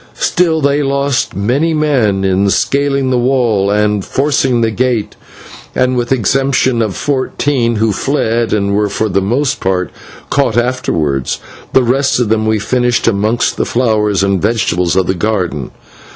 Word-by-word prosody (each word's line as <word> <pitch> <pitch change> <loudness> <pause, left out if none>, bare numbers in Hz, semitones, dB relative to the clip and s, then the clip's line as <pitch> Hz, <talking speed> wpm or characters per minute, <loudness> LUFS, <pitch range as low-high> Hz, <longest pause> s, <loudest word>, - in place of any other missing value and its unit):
Still 165 -3 +1
they 140 +1 +1
lost 140 -1 -1
many 135 +11 0
men 125 -11 +1
in 95 +1 +2
scaling 140 +3 0
the 125 - +2
wall 120 -6 +1
and 105 -1 +1
forcing 135 -2 0
the 115 -1 +1
gate, 120 -1 -1 0.6
and 130 0 +1
with 120 -1 -1
the 135 - +3
exception 130 +1 +1
of 105 -4 -2
fourteen 130 -3 -1
who 110 0 +1
fled, 115 -3 -1
and 100 -1 0
were 105 0 +1
for 110 +2 -1
the 100 0 +1
most 125 +8 0
part 90 -1 -1 0.4
caught 135 -5 +1
afterwards, 80 - -1 0.3
the 130 - +4
rest 135 +2 +1
of 120 -4 0
them 110 0 +1
we 110 0 +2
finished 120 +3 0
amongst 110 +2 0
the - - +1
flowers 105 -5 +1
and 100 -2 +1
vegetables 90 -6 0
of 95 -1 +2
the 95 - 0
garden. 90 - -2
115 Hz, 160 wpm, -14 LUFS, 100-135 Hz, 0.6 s, the